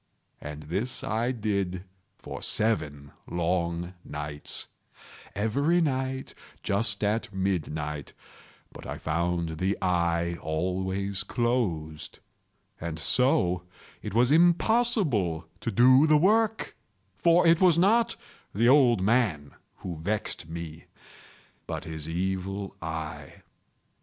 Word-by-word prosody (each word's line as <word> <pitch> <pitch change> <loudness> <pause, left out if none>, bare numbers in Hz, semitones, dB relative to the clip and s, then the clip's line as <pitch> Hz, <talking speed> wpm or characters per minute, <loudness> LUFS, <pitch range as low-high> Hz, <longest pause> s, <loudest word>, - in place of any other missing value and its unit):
And 75 +1 -7
this 95 - -2
I 115 +3 0
did 100 -6 -2 0.3
for - - -8
seven 75 -11 -1 0.2
long 85 0 -1
nights—every 105 - -3
night 130 -4 -1 0.3
just 105 +1 0
at 105 +2 0
midnight—but 75 -7 -5
I - - -5
found 85 0 -2
the 95 +2 0
eye 85 -2 0
always 95 +4 -2
closed; 90 -9 -2 0.6
and 80 -1 -4
so 90 - +2 0.4
it - - -6
was 120 +3 +4
impossible 170 - +3
to 105 - -3
do 130 +5 +6
the 155 -1 +6
work; 220 +6 +2 0.4
for 170 +1 +4
it 165 +1 +5
was 180 -3 +5
not 220 +6 +3 0.4
the 115 +4 +3
old 125 -6 +5
man 100 - +1 0.3
who 90 -3 -4
vexed 95 -1 -2
me, 80 -1 -7 0.8
but - - -4
his 80 -1 -6
Evil 95 +3 -3
Eye. 80 -3 -6
95 Hz, 100 wpm, -27 LUFS, 85-125 Hz, 0.8 s, do